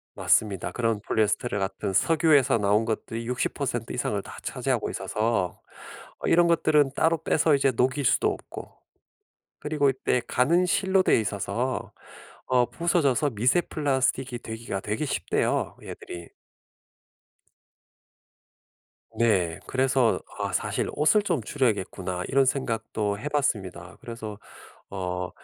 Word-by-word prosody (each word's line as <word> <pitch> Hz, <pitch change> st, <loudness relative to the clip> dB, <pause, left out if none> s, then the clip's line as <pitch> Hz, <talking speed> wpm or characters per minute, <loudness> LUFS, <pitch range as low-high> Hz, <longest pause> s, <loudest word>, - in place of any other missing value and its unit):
맞습니다. 95 Hz, -4 st, +1 dB
그런 115 Hz, -1 st, 0 dB
폴리에스테르 110 Hz, +1 st, 0 dB
같은 95 Hz, +1 st, -3 dB
석유에서 150 Hz, -, +4 dB
나온 105 Hz, +1 st, +2 dB
것들이 115 Hz, +1 st, -4 dB
60% 125 Hz, +1 st, -2 dB
이상을 -, -, -1 dB
다 -, -, -11 dB
차지하고 -, -, -2 dB
있어서 110 Hz, -4 st, -1 dB, 0.6 s
어 -, -, -5 dB
이런 170 Hz, +1 st, +5 dB
것들은 150 Hz, -4 st, +3 dB
따로 160 Hz, +2 st, +1 dB
빼서 160 Hz, -1 st, +3 dB
이제 135 Hz, -1 st, +2 dB
녹일 130 Hz, +4 st, +1 dB
수도 -, -, +3 dB
없고 -, -, -6 dB, 0.9 s
그리고 150 Hz, -1 st, +1 dB
이때 130 Hz, -1 st, +1 dB
가는 170 Hz, +9 st, +2 dB
실로 190 Hz, +1 st, +2 dB
돼 -, -, +4 dB
있어서 105 Hz, -, -3 dB, 0.6 s
어 125 Hz, -1 st, +3 dB
부서져서 150 Hz, -1 st, +1 dB
미세 125 Hz, +10 st, +2 dB
플라스틱이 130 Hz, -5 st, -1 dB
되기가 110 Hz, -3 st, -5 dB
되게 105 Hz, +8 st, -2 dB
쉽대요 -, -, -1 dB
얘들이. 85 Hz, -1 st, -9 dB, 2.9 s
네. 95 Hz, -7 st, +2 dB
그래서 130 Hz, -3 st, +2 dB, 0.2 s
'아 -, -, -2 dB
사실 -, -, -1 dB
옷을 180 Hz, +8 st, +3 dB
좀 170 Hz, -, -1 dB
줄여야겠구나.' 95 Hz, -8 st, -1 dB
이런 135 Hz, 0 st, +4 dB
생각도 110 Hz, -6 st, -1 dB
해봤습니다. 105 Hz, -11 st, -2 dB
그래서 110 Hz, -3 st, -7 dB, 0.5 s
어 90 Hz, -2 st, -3 dB
120 Hz, 280 characters per minute, -26 LUFS, 105-145 Hz, 2.9 s, 이런